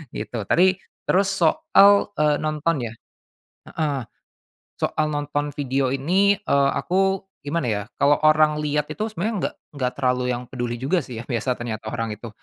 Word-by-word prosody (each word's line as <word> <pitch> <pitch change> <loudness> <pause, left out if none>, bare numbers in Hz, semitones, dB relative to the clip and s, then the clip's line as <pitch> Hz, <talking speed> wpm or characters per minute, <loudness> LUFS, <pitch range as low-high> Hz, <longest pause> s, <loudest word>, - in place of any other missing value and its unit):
gitu. 105 -1 -5
Tapi 185 +2 +4 0.3
terus 190 +1 +3
soal, 205 -6 +5
eee, 150 -1 +2
nonton 155 +2 0
ya 115 - -6 0.8
heeh, 150 -4 -1 0.8
soal 155 - 0
nonton 145 0 -2
video 135 -1 0
ini, 185 +9 +2
eee, 140 0 +2
aku 195 +1 0 0.2
gimana 145 -2 -2
ya? 105 -2 -1 0.2
Kalau 145 +1 +4
orang 155 0 +4
liat 150 -1 0
itu 215 +7 -3
sebenernya 215 +3 -2
nggak - - -21 0.3
nggak 125 0 0
terlalu 125 -2 +1
yang 125 0 -4
peduli 120 -1 -4
juga 140 +9 0
sih 125 -4 -9
ya, - - -6
biasa 125 0 -1
ternyata 110 -2 -5
orang 115 -1 -3
itu. 115 +3 -9
145 Hz, 160 wpm, -23 LUFS, 125-170 Hz, 0.8 s, soal